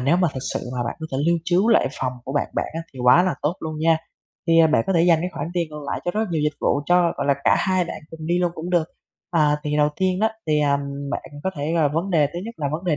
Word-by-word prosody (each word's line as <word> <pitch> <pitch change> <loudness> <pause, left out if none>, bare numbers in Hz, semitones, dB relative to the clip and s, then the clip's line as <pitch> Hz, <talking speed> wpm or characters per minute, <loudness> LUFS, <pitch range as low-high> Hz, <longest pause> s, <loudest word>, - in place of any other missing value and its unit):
nếu 140 +7 +3
mà 180 -1 +3
thực 130 - -4
sự - - -1 0.2
mà 120 - 0
bạn 120 - -4
có 160 - -4
thể 130 - -1
lưu 170 0 +3
trú 185 +6 +2
lại 220 - +4
phòng 130 -1 -1
của 135 - -5
bạn 145 - 0
bạn, - - 0
á, 165 - -2
thì 130 - -12
quá 165 +8 +7
là 185 - 0
tốt 155 +4 +1
luôn 155 -1 -5
nha. 160 +1 +3 0.5
Thì, 165 0 +4
ờ, 165 - +7
bạn 150 -8 +3
có 195 - +1
thể 165 - +3
dành 170 -2 +5
cái 180 +1 -2
khoản - - -4
tiền 170 -2 0
còn 150 0 -7
lại - - -3
cho 175 - 0
rất 215 - -1
là 220 - 0
nhiều 155 -3 0
dịch 150 -1 0
vụ 140 - +1
cho, 175 -1 +4
gọi 140 - -2
là, 140 - +4
cả - - +5
hai 185 -2 +1
bạn - - -7
cùng 160 -1 -8
đi 175 +2 +1
luôn 175 -1 +1
cũng 170 +3 -6
được. 170 -3 +3 0.5
À, 150 -3 +3
thì 150 0 -1
đầu 150 0 +4
tiên 185 0 0
á 220 +1 +3 0.2
thì, 150 -1 +2
ờm, 140 -1 +2 0.3
bạn - - -3 0.2
có 190 - +1
thể 145 +3 -2
là 160 -3 +3
vấn 165 +7 -2
đề 155 -4 +4
thứ 150 +5 -7
nhất 230 +1 -7
là 145 -2 -1
vấn 170 +4 -4
đề 160 -4 +1
165 Hz, 315 wpm, -22 LUFS, 150-175 Hz, 0.5 s, quá